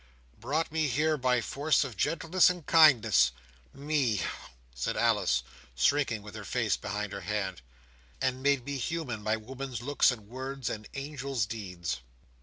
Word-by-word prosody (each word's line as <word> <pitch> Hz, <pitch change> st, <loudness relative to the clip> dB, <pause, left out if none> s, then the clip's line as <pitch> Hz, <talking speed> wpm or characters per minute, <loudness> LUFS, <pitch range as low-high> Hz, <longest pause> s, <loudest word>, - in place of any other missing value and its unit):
"Brought 155 Hz, +3 st, -1 dB
me 160 Hz, -1 st, +1 dB
here, 155 Hz, +4 st, +2 dB
by 125 Hz, -3 st, +2 dB
force 145 Hz, +6 st, +1 dB
of 130 Hz, -5 st, -6 dB
gentleness 165 Hz, -, +3 dB
and 180 Hz, -4 st, -4 dB
kindness. 150 Hz, -, +6 dB, 0.4 s
Me!" 140 Hz, -6 st, 0 dB, 0.5 s
said -, -, -2 dB
Alice, 105 Hz, -, +2 dB, 0.3 s
shrinking 115 Hz, -, +2 dB
with 105 Hz, -, -10 dB
her -, -, -7 dB
face -, -, 0 dB
behind 105 Hz, 0 st, -4 dB
her 100 Hz, -, -5 dB
hand, 95 Hz, -6 st, -3 dB, 0.6 s
"and 130 Hz, 0 st, -1 dB
made 140 Hz, -2 st, +2 dB
me 140 Hz, -1 st, -3 dB
human 130 Hz, -6 st, -3 dB
by 110 Hz, +1 st, +1 dB
woman's 130 Hz, +1 st, -6 dB
looks 145 Hz, +2 st, +4 dB
and 110 Hz, -5 st, -4 dB
words, 130 Hz, +2 st, -4 dB
and 105 Hz, -1 st, -7 dB
angel's 135 Hz, -4 st, -2 dB
deeds!" 90 Hz, -, -5 dB
130 Hz, 150 wpm, -30 LUFS, 105-145 Hz, 0.6 s, kindness